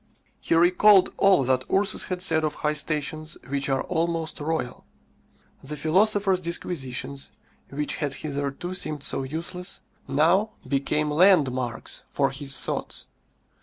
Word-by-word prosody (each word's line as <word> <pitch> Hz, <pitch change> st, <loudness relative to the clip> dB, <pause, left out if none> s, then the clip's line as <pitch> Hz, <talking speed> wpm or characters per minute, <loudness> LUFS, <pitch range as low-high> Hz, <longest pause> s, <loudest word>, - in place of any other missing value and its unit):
He -, -, 0 dB
recalled 185 Hz, +3 st, +5 dB
all 195 Hz, -7 st, +4 dB
that 130 Hz, 0 st, 0 dB
Ursus 200 Hz, +1 st, +1 dB
had 180 Hz, -1 st, -2 dB
said 160 Hz, -4 st, +3 dB
of 155 Hz, -1 st, -2 dB
high 150 Hz, 0 st, -1 dB
stations 155 Hz, +1 st, +1 dB
which 140 Hz, 0 st, +1 dB
are 135 Hz, -1 st, 0 dB
almost 165 Hz, -1 st, -2 dB
royal. 150 Hz, -4 st, -4 dB, 0.8 s
The 150 Hz, +2 st, -6 dB
philosopher's 195 Hz, +4 st, +2 dB
disquisitions, 140 Hz, -5 st, -1 dB, 0.4 s
which 150 Hz, +2 st, -1 dB
had 145 Hz, -3 st, -2 dB
hitherto 140 Hz, +4 st, -4 dB
seemed 155 Hz, -6 st, 0 dB
so -, -, +1 dB
useless, 170 Hz, +6 st, -2 dB, 0.3 s
now 180 Hz, +10 st, +2 dB
became 150 Hz, +2 st, -1 dB
landmarks 145 Hz, -8 st, +2 dB
for 135 Hz, -2 st, 0 dB
his 135 Hz, 0 st, -3 dB
thoughts. -, -, -4 dB
155 Hz, 130 wpm, -24 LUFS, 140-180 Hz, 0.8 s, recalled